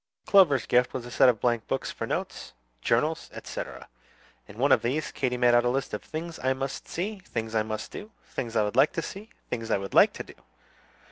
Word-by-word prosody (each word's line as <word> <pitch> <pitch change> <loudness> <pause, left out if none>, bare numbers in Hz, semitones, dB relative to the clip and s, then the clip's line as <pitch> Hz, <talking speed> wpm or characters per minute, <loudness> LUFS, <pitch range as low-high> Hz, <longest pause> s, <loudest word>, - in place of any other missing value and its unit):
Clover's 170 -10 +5
gift 125 0 +2
was 125 -2 -4
a 120 - -9
set 125 - +6
of 115 -4 +1
blank 120 -2 0
books - - -2
for - - -5
notes, - - -4 0.3
journals, 150 - +1
etc. - - -7 0.6
In 105 - -13
one 135 +3 +2
of - - +6
these, 135 +6 -1
Katy 125 -2 -1
made 120 -1 +4
out 120 0 +5
a 120 - +2
list 135 +1 -2
of 105 - -3
"Things 165 +1 -6
I 130 0 +3
must 135 +1 -5
see," 200 +4 -3
"Things 115 -11 -5
I 110 - +3
must 110 0 -5
do," 210 - -8 0.2
"Things 115 -2 -5
I 110 - +4
would 105 +2 -2
like 135 +4 +5
to 165 - -2
see," 210 +3 -8 0.2
"Things 115 -2 -3
I - - +3
would 95 -1 -6
like - - +6
to - - -6
do." - - -14
125 Hz, 225 wpm, -27 LUFS, 115-155 Hz, 0.6 s, set